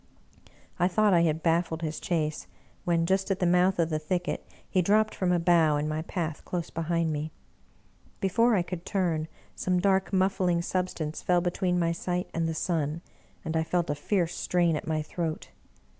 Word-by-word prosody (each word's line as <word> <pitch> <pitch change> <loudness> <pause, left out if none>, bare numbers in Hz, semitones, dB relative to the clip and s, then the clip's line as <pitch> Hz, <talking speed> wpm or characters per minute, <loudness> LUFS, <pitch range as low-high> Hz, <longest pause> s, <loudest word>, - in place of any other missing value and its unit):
I 175 - +4
thought 205 +2 +3
I 170 - +5
had 160 -1 +1
baffled 165 -1 +1
his 155 0 -3
chase, 155 -3 -2 0.4
when, 170 -1 +2
just 190 +2 +1
at 195 - +1
the 180 - +1
mouth 180 +2 +3
of 165 -1 +1
the 155 - 0
thicket, 175 +3 -2 0.2
he 185 - +2
dropped 215 +4 +3
from 185 -2 0
a 175 - +3
bough 165 -3 +4
in 150 +1 -1
my 155 +1 -2
path 165 -2 -4
close 175 -2 -4
behind 165 -1 0
me. 150 +1 -3 0.9
Before 230 +5 +3
I 180 - +2
could 175 -1 -6
turn, 170 -5 0 0.3
some 180 -1 0
dark 190 0 +2
muffling 185 -3 +2
substance 175 -4 -2
fell 180 -1 +3
be 175 0 0
tween 180 0 0
my 170 -1 +2
sight 180 +1 -3
and 165 0 0
the 160 - -3
sun, 160 -1 -1 0.4
and 160 - -2
I 160 - +2
felt 170 -1 0
a - - +1
fierce 170 +3 0
strain 175 -2 +1
at - - -5
my 155 -1 0
throat. 160 0 -4
170 Hz, 190 wpm, -28 LUFS, 160-185 Hz, 0.9 s, I